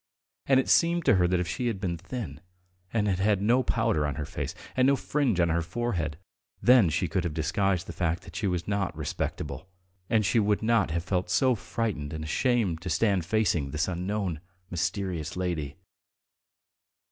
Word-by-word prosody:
And 135 Hz, -1 st, +5 dB
it 130 Hz, -, 0 dB
seemed 170 Hz, 0 st, +3 dB
to 100 Hz, -, +5 dB
her 90 Hz, -1 st, +3 dB
that 90 Hz, 0 st, +1 dB
if 90 Hz, -, -1 dB
she 120 Hz, +10 st, -2 dB
had 110 Hz, -5 st, -2 dB
been 90 Hz, -3 st, -2 dB
thin, 95 Hz, -, -6 dB, 0.5 s
and 105 Hz, -2 st, +1 dB
had 95 Hz, -2 st, 0 dB
had 100 Hz, 0 st, +2 dB
no 115 Hz, +6 st, +3 dB
powder 115 Hz, -12 st, +1 dB
on 75 Hz, -, -3 dB
her 75 Hz, -1 st, -3 dB
face -, -, -5 dB, 0.2 s
and 130 Hz, 0 st, +4 dB
no 140 Hz, -, +5 dB
fringe 135 Hz, -8 st, 0 dB
on 85 Hz, -1 st, +3 dB
her 85 Hz, +1 st, +1 dB
forehead, 85 Hz, -5 st, -2 dB, 0.4 s
then 120 Hz, -7 st, +6 dB
she 85 Hz, +4 st, 0 dB
could 85 Hz, +3 st, -1 dB
have 85 Hz, -4 st, -3 dB
disguised 95 Hz, +3 st, 0 dB
the -, -, -7 dB
fact 85 Hz, -1 st, -1 dB
that 85 Hz, -4 st, -13 dB
she 105 Hz, -, -1 dB
was 90 Hz, -2 st, -2 dB
not 100 Hz, -5 st, -1 dB
"respectable," 75 Hz, +1 st, -4 dB, 0.4 s
and 110 Hz, -2 st, +3 dB
she 115 Hz, -, +3 dB
would 105 Hz, 0 st, +1 dB
not 115 Hz, -4 st, +3 dB
have 85 Hz, +1 st, -1 dB
felt 90 Hz, -1 st, -1 dB
so 130 Hz, +7 st, +3 dB
frightened 90 Hz, -6 st, -3 dB
and 80 Hz, 0 st, -4 dB
ashamed 100 Hz, -, +1 dB
to -, -, -4 dB
stand 95 Hz, +1 st, +2 dB
facing 85 Hz, -8 st, +1 dB
this 75 Hz, +2 st, -1 dB
unknown, 90 Hz, -2 st, -2 dB, 0.3 s
mysterious 90 Hz, -2 st, -2 dB
lady. 80 Hz, -6 st, -2 dB
95 Hz, 190 wpm, -28 LUFS, 85-110 Hz, 0.5 s, then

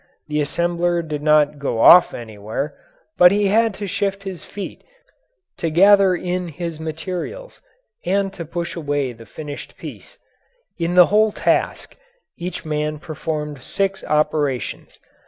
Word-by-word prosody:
The 150 Hz, 0 st, 0 dB
assembler 170 Hz, +2 st, 0 dB
did 150 Hz, -1 st, -4 dB
not 150 Hz, -1 st, +3 dB
go 135 Hz, -5 st, -2 dB
off 180 Hz, +9 st, +8 dB
anywhere, 110 Hz, +4 st, -5 dB, 0.4 s
but 180 Hz, 0 st, +8 dB
he 205 Hz, 0 st, +2 dB
had 225 Hz, 0 st, +2 dB
to 205 Hz, -, -5 dB
shift 195 Hz, +1 st, -2 dB
his 190 Hz, -4 st, -7 dB
feet 200 Hz, -1 st, -8 dB, 0.7 s
to 165 Hz, -, -1 dB
gather 195 Hz, +3 st, +5 dB
in 180 Hz, 0 st, -3 dB
his 165 Hz, 0 st, -6 dB
materials 180 Hz, -, -6 dB, 0.4 s
and 195 Hz, 0 st, 0 dB
to 175 Hz, -, -6 dB
push 170 Hz, +1 st, -5 dB
away 145 Hz, -5 st, -2 dB
his 115 Hz, -2 st, -15 dB
finished 145 Hz, +1 st, -8 dB
piece. -, -, -10 dB, 0.6 s
In 170 Hz, +1 st, -1 dB
the 180 Hz, -1 st, +9 dB
whole 215 Hz, 0 st, +4 dB
task, -, -, -1 dB, 0.4 s
each 180 Hz, 0 st, -6 dB
man 150 Hz, 0 st, -2 dB
performed 150 Hz, -2 st, -5 dB
six 195 Hz, +7 st, -2 dB
operations. 150 Hz, -3 st, -1 dB
170 Hz, 135 wpm, -21 LUFS, 150-190 Hz, 0.7 s, the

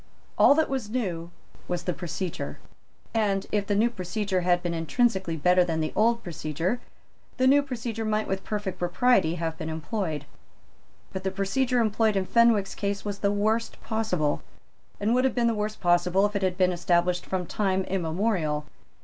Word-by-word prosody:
All 280 Hz, -, +6 dB
that 315 Hz, 0 st, +3 dB
was 260 Hz, -6 st, -3 dB
new 180 Hz, -9 st, -2 dB, 0.4 s
was 175 Hz, -1 st, -2 dB
the 180 Hz, -, -1 dB
procedure; 175 Hz, 0 st, -4 dB, 0.6 s
and, 200 Hz, -4 st, +1 dB
if 205 Hz, -2 st, 0 dB
the 205 Hz, -, +1 dB
new 230 Hz, +4 st, +3 dB
procedure 190 Hz, -1 st, -2 dB
had 175 Hz, 0 st, +2 dB
been 175 Hz, -1 st, -1 dB
intrinsically 185 Hz, -, 0 dB
better 180 Hz, +4 st, +4 dB
than 165 Hz, -2 st, -1 dB
the 155 Hz, -, -2 dB
old 235 Hz, +2 st, +2 dB
procedure, 170 Hz, -, -2 dB, 0.6 s
the 255 Hz, -, +2 dB
new 280 Hz, +2 st, +6 dB
procedure 235 Hz, -4 st, -4 dB
might 215 Hz, 0 st, 0 dB
with 190 Hz, 0 st, -2 dB
perfect 205 Hz, -3 st, -4 dB
propriety 180 Hz, -1 st, +2 dB
have 165 Hz, -1 st, -3 dB
been 155 Hz, -, -4 dB
employed. 160 Hz, -2 st, -3 dB, 0.9 s
But 190 Hz, -, -4 dB
the 190 Hz, -, 0 dB
procedure 240 Hz, +7 st, 0 dB
employed 220 Hz, -1 st, +2 dB
in 190 Hz, -1 st, +1 dB
Fenwick's 230 Hz, -3 st, +3 dB
case 200 Hz, 0 st, -3 dB
was 200 Hz, -1 st, -4 dB
the 200 Hz, 0 st, +1 dB
worst 215 Hz, +3 st, 0 dB
possible, 215 Hz, -10 st, 0 dB, 0.6 s
and 210 Hz, +3 st, +1 dB
would 255 Hz, +1 st, +3 dB
have 265 Hz, -, +1 dB
been 240 Hz, -2 st, +2 dB
the 230 Hz, -, +3 dB
worst 215 Hz, 0 st, -3 dB
possible 175 Hz, +2 st, +3 dB
if 205 Hz, 0 st, -2 dB
it 200 Hz, -, 0 dB
had 185 Hz, -1 st, 0 dB
been 185 Hz, -1 st, +3 dB
established 175 Hz, +1 st, +1 dB
from 185 Hz, -1 st, -2 dB
time 190 Hz, 0 st, 0 dB
immemorial. 170 Hz, -4 st, -1 dB
195 Hz, 175 wpm, -26 LUFS, 175-220 Hz, 0.9 s, All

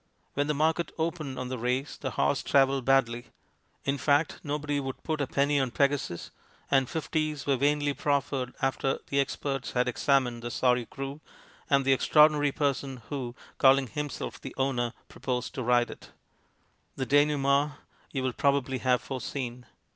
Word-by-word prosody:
When 145 Hz, +1 st, 0 dB
the 150 Hz, -, 0 dB
market 160 Hz, +3 st, +1 dB
opened 160 Hz, -4 st, -2 dB
on 125 Hz, 0 st, -4 dB
the 130 Hz, -1 st, -4 dB
race 125 Hz, +4 st, -1 dB
the 135 Hz, -, -4 dB
horse 135 Hz, -, +1 dB
travelled 135 Hz, -2 st, +3 dB
badly; 120 Hz, -3 st, +2 dB, 0.6 s
in 140 Hz, 0 st, 0 dB
fact, 145 Hz, +3 st, +2 dB
nobody 145 Hz, 0 st, -1 dB
would 135 Hz, -1 st, -5 dB
put 155 Hz, -2 st, -1 dB
a 140 Hz, -, 0 dB
penny 140 Hz, +2 st, +2 dB
on 135 Hz, -2 st, +1 dB
Pegasus, 140 Hz, -9 st, 0 dB, 0.4 s
and 135 Hz, -2 st, +3 dB
fifties 155 Hz, -2 st, -2 dB
were 140 Hz, -, +3 dB
vainly 145 Hz, +2 st, +1 dB
proffered 140 Hz, -3 st, -1 dB
after 135 Hz, 0 st, +1 dB
the 140 Hz, -, +2 dB
experts 135 Hz, -1 st, -2 dB
had 125 Hz, 0 st, +2 dB
examined 125 Hz, -1 st, +1 dB
the 120 Hz, -, -4 dB
sorry 125 Hz, 0 st, +2 dB
screw, 135 Hz, +4 st, -7 dB, 0.5 s
and 140 Hz, -1 st, +3 dB
the 135 Hz, -, +5 dB
extraordinary 150 Hz, +1 st, +5 dB
person 135 Hz, -4 st, -2 dB
who, 125 Hz, -4 st, -4 dB, 0.2 s
calling 135 Hz, 0 st, +6 dB
himself 145 Hz, +5 st, -5 dB
the -, -, -8 dB
owner, 125 Hz, -3 st, 0 dB
proposed 125 Hz, -2 st, -3 dB
to -, -, -4 dB
ride 120 Hz, 0 st, +2 dB
it. -, -, -12 dB, 0.8 s
The 130 Hz, -, -2 dB
denouement 145 Hz, +1 st, +3 dB, 0.4 s
you 135 Hz, -2 st, -3 dB
will 130 Hz, -1 st, 0 dB
probably 135 Hz, -1 st, +1 dB
have 125 Hz, -1 st, +2 dB
foreseen. 125 Hz, -2 st, -5 dB
135 Hz, 160 wpm, -28 LUFS, 130-145 Hz, 0.8 s, calling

